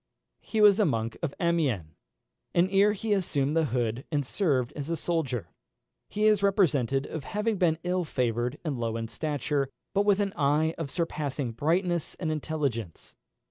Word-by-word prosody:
He 220 - -2
was 205 0 +7
a 210 - +5
monk 115 -6 -1
of 160 -5 -3
Amiens, 160 - +1 0.7
and 175 +2 +4
ere 200 +2 +5
he 210 +1 -1
assumed 150 -7 0
the 165 -1 +3
hood 120 -1 -1
had 145 -3 0
served 130 - 0
as 145 +1 -5
a 165 - -1
soldier. 155 - -2 0.6
He 210 +1 0
is 215 -2 +4
represented 145 - +2
as 155 - -6
having 210 +4 -1
been 165 -4 +3
ill 180 0 0
favoured 125 -2 -1
and 140 -6 -2
low 115 -1 -1
in 115 -1 -4
stature, 145 -2 -1 0.2
but 200 - +3
with 205 -1 +3
an 200 -1 0
eye 150 +3 +2
of 160 -4 -3
surpassing 145 -6 -2
brightness 170 - 0
and 160 -4 -2
intelligence. 140 - -3
155 Hz, 170 wpm, -28 LUFS, 130-185 Hz, 0.7 s, was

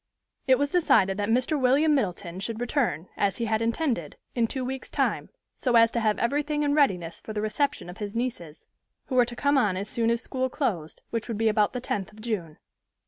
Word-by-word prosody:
It 260 -1 +6
was 285 +1 0
decided 195 - +3
that 205 0 -1
Mr. 255 +5 +2
William 280 +5 +4
Middleton 185 -8 -2
should 220 +3 -4
return, 240 - -1
as 200 -2 +1
he 235 - -1
had 220 0 0
intended, 230 - -1 0.2
in 235 -2 +1
two 260 +1 -3
weeks' 265 +1 -5
time, - - -1 0.3
so 250 -3 +1
as 230 0 +6
to 235 - 0
have 215 -2 +1
everything 295 +4 0
in 285 -1 +2
readiness 180 - +1
for 215 - -7
the 210 - -2
reception 245 0 -1
of 180 +4 -10
his 205 0 -5
nieces, 230 -11 -4 0.4
who 260 - -2
were 245 -1 +6
to 240 0 -7
come 285 +2 +3
on 205 -7 +1
as 200 +2 -3
soon 230 0 0
as 235 0 +2
school 260 +1 -2
closed, 185 - -3
which 230 -1 -2
would 230 -3 -3
be 225 0 +3
about 210 -1 +2
the 250 - -2
tenth 200 -5 -3
of 215 - -16
June. 205 -9 -4
230 Hz, 220 wpm, -26 LUFS, 205-260 Hz, 0.4 s, It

